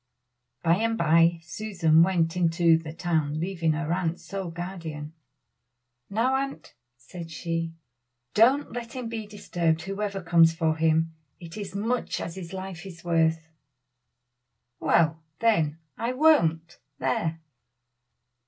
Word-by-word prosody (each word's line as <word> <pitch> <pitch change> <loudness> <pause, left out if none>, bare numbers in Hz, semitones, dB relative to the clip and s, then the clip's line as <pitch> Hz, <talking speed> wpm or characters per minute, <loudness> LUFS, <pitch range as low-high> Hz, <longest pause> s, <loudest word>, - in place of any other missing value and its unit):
By 170 +1 +4
and 225 +1 0
by 165 -1 +4
Susan 165 -2 +2
went 170 -1 +2
into 170 -1 +4
the 160 -1 -7
town, 160 -3 -1
leaving 170 -2 0
her 160 +1 -1
aunt 175 -2 -1
sole 195 -3 -5
guardian. 165 -3 -6 1.0
"Now, 230 +6 +1
aunt," 275 0 -5 0.2
said 165 +8 -9
she, 165 0 -3 0.6
"don't 260 +7 +4
let 235 -1 -6
him 250 -3 -5
be 220 -2 -5
disturbed 170 -6 -1
whoever 195 0 -3
comes 165 -1 +5
for 160 -1 +1
him. 160 0 +2 0.3
It 165 -2 -10
is 200 -3 -6
as - - -11
much 230 +5 -1
as 170 - -5
his 180 -3 -8
life 190 -3 -6
is 170 -3 -11
worth!" 165 -1 +2 1.3
"Well, 165 -1 +2 0.2
then, 165 -10 +2 0.2
I 235 +2 -1
won't! 170 - +3 0.2
there." 155 +5 -1
170 Hz, 130 wpm, -26 LUFS, 165-200 Hz, 1.3 s, comes